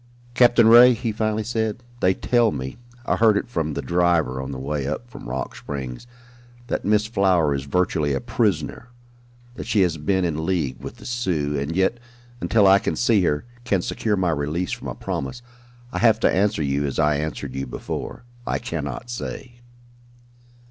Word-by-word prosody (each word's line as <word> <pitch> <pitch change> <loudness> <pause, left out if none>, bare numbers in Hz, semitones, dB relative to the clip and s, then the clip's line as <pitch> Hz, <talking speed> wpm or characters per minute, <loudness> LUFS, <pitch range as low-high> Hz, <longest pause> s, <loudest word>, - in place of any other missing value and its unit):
"Captain 120 -2 +5
Ray," 120 +2 +8
he 115 0 -2
finally 110 0 -1
said, 110 +1 -2 0.2
"they 95 -3 +3
tell 120 -2 +2
me 65 -1 -5 0.3
I - - +1
heard 110 -2 +5
it - - -2
from 80 -10 -2
the - - -3
driver 85 -7 +1
on 65 +1 -5
the 65 - -5
way 70 +1 -3
up 80 - -4
from 120 - -10
Rock 65 +1 -4
Springs 65 - -6 0.6
that - - -2
Miss 105 +1 +2
Flower 95 -8 +2
is 70 -1 -3
virtually 85 -1 0
a - - -1
prisoner, 115 -3 -1 0.6
that - - -8
she 105 - +2
had 80 -5 0
been 95 +1 +1
in 80 -2 -2
league 80 -8 -1
with 70 - -8
the 110 - -14
Sioux, 90 - -1
and 70 +3 -2
yet, 95 +6 +1 0.4
until 110 -3 +3
I 95 0 +7
can - - -2
see 115 -4 +3
her 75 -1 0 0.2
can 100 -7 0
secure 105 -2 -1
my 90 -2 +1
release 75 +4 -2
from - - -5
a - - -5
promise, 70 - -5 0.5
I - - -3
have 115 -2 +4
to - - +4
answer 100 -4 +1
you 70 +1 0
as 70 - -4
I 75 -2 +3
answered 75 -3 -4
you 65 0 -4
before - - -6 0.2
I - - 0
cannot 70 - -5
say." 120 +1 -7
90 Hz, 185 wpm, -23 LUFS, 75-110 Hz, 0.6 s, Ray